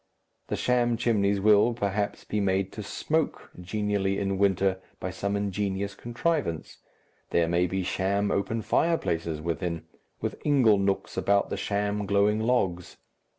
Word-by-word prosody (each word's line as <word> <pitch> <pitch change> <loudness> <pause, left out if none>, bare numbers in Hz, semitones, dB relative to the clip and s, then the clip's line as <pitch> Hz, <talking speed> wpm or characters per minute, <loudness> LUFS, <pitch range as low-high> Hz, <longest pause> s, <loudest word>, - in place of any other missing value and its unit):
The - - -1
sham 120 -1 +1
chimneys 100 -4 +2
will, 105 +3 +4
perhaps, 100 -2 -2
be 105 - -2
made 95 -1 +1
to 110 - -7
smoke 155 +9 -2
genially 100 0 -1
in 100 -1 -1
winter 95 -1 +2 0.2
by 95 - -4
some 100 +2 -2
ingenious 100 0 -2
contrivance, 120 - -2 0.5
there 85 -1 +2
may 85 +2 +2
be 95 +1 -2
sham 100 +3 0
open 110 +3 -1
fireplaces 85 - 0
within, 85 0 -3 0.3
with - - -4
ingle 125 -9 +4
nooks 100 0 -1
about 100 0 +2
the - - 0
sham 105 0 -1
glowing 100 +2 +3
logs. 100 -7 0
100 Hz, 140 wpm, -27 LUFS, 95-105 Hz, 0.5 s, will